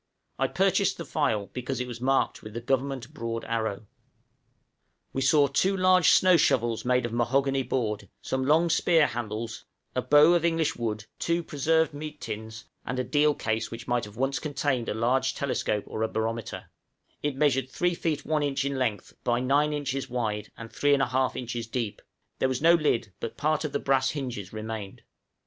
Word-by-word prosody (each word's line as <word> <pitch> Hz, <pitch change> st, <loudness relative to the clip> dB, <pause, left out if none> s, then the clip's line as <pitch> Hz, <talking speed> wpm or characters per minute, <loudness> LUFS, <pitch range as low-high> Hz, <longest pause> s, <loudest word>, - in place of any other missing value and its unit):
I -, -, +2 dB
purchased -, -, +2 dB
the -, -, -6 dB
file 105 Hz, -2 st, -1 dB
because 125 Hz, +1 st, -3 dB
it 125 Hz, -, -2 dB
was 120 Hz, -1 st, -7 dB
marked 135 Hz, +1 st, +1 dB
with 110 Hz, 0 st, -10 dB
the -, -, -2 dB
Government 135 Hz, +2 st, -2 dB
broad 115 Hz, -5 st, -4 dB
arrow. 110 Hz, -2 st, -2 dB, 1.3 s
We 135 Hz, -, -1 dB
saw 140 Hz, +2 st, +5 dB
two 185 Hz, +8 st, +1 dB
large 185 Hz, -2 st, +5 dB
snow 185 Hz, -2 st, +6 dB
shovels 120 Hz, -6 st, +2 dB
made 125 Hz, 0 st, +2 dB
of 115 Hz, -, -4 dB
mahogany 135 Hz, +3 st, +1 dB
board, 115 Hz, -5 st, -2 dB
some 130 Hz, 0 st, -2 dB
long 165 Hz, +3 st, +4 dB
spear 165 Hz, -2 st, +4 dB
handles, 115 Hz, -1 st, -4 dB, 0.3 s
a -, -, 0 dB
bow 150 Hz, +3 st, +6 dB
of 170 Hz, -2 st, +2 dB
English 165 Hz, -2 st, +1 dB
wood, 110 Hz, -3 st, -3 dB
two 170 Hz, 0 st, 0 dB
preserved 160 Hz, +2 st, +1 dB
meat 150 Hz, +1 st, -7 dB
tins, 110 Hz, 0 st, -7 dB, 0.2 s
and 125 Hz, -, -4 dB
a 130 Hz, -, 0 dB
deal 150 Hz, +2 st, +2 dB
case 110 Hz, 0 st, -2 dB
which 115 Hz, 0 st, -8 dB
might 120 Hz, -2 st, 0 dB
have 105 Hz, +1 st, -13 dB
once 135 Hz, +2 st, 0 dB
contained 145 Hz, -5 st, -1 dB
a -, -, -2 dB
large 130 Hz, +4 st, +1 dB
telescope 115 Hz, -6 st, -1 dB
or 110 Hz, -, -5 dB
a 110 Hz, -, +2 dB
barometer; 115 Hz, +1 st, -4 dB, 0.5 s
it 145 Hz, -2 st, -1 dB
measured 135 Hz, -2 st, +2 dB
3 175 Hz, +6 st, 0 dB
feet 155 Hz, -4 st, -2 dB
1 155 Hz, -1 st, +1 dB
inch 140 Hz, -1 st, 0 dB
in 140 Hz, -1 st, -2 dB
length 110 Hz, -5 st, -2 dB
by 120 Hz, -1 st, +1 dB
9 140 Hz, +4 st, +2 dB
inches 140 Hz, -2 st, -3 dB
wide 110 Hz, -4 st, -2 dB
and 115 Hz, 0 st, -9 dB
3 145 Hz, +4 st, +3 dB
1/2 130 Hz, -1 st, +1 dB
inches 120 Hz, -2 st, -4 dB
deep; 115 Hz, -3 st, -3 dB, 0.4 s
there 130 Hz, -, +2 dB
was 130 Hz, -1 st, -1 dB
no 165 Hz, +2 st, +6 dB
lid, 120 Hz, -, +1 dB
but -, -, -5 dB
part 155 Hz, +2 st, +1 dB
of 155 Hz, -, -3 dB
the -, -, 0 dB
brass 135 Hz, -2 st, +2 dB
hinges 125 Hz, -10 st, -5 dB
remained. 110 Hz, -2 st, -6 dB
130 Hz, 185 wpm, -27 LUFS, 115-145 Hz, 1.3 s, snow